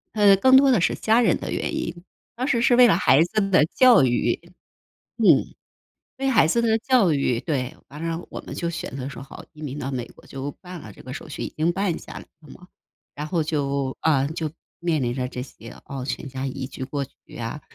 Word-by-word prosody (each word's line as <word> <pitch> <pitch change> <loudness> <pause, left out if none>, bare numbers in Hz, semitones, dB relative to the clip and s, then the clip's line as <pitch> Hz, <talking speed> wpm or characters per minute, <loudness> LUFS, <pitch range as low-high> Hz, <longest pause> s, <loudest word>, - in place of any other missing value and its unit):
呃， 205 -2 +6
更 260 +6 +5
多 275 -1 +5
的 230 - +4
是 - - +2
家 225 +2 +3
人 - - +3
的 - - -5
原 - - -2
因。 175 0 -4 0.3
当 255 +3 -2
时 235 -4 +2
是 240 +1 +4
为 250 -1 +8
了 170 - +4
孩 145 -3 +4
子 200 +2 -1
的 155 -5 +5
教 245 - +5
育， 120 -1 +1 0.8
嗯。 - - +4 0.6
对 270 0 0
孩 210 -10 +5
子 235 +8 +1
的 225 -1 +2
教 230 - +3
育， 125 -4 0
对。 140 -2 -3
完 150 +4 -8
了 165 +1 -3
我 - - -6
们 - - -8
就 170 -1 -2
选 135 -5 -6
择 135 0 -4
说： 140 - -9
“好， - - -11
移 155 0 -13
民 145 0 -5
到 135 - -3
美 125 -2 -4
国。” - - -18
就 135 +1 -6
办 180 -2 -9
了 105 - -11
这 - - -15
个 - - -8
手 - - -8
续 - - -6
已 - - -5
经 165 +3 +1
办 195 -2 -1
下 - - -12
来 - - -7 0.2
了 150 - -17
嘛。 180 0 -14 0.5
然 150 +1 -4
后 165 0 0
就 140 -3 -2
啊， 140 -4 +2
就 160 -1 -4 0.3
面 165 -5 0
临 120 0 0
着 125 0 -2
这 125 0 -6
些 115 -3 -12 0.2
哦， 135 -2 -5
全 135 +1 -4
家 130 +1 -4
移 130 0 -4
居 130 - -6
过 140 +1 -3
去 135 - -17
啊， 120 +6 -5
155 Hz, 250 characters per minute, -23 LUFS, 135-195 Hz, 0.8 s, 为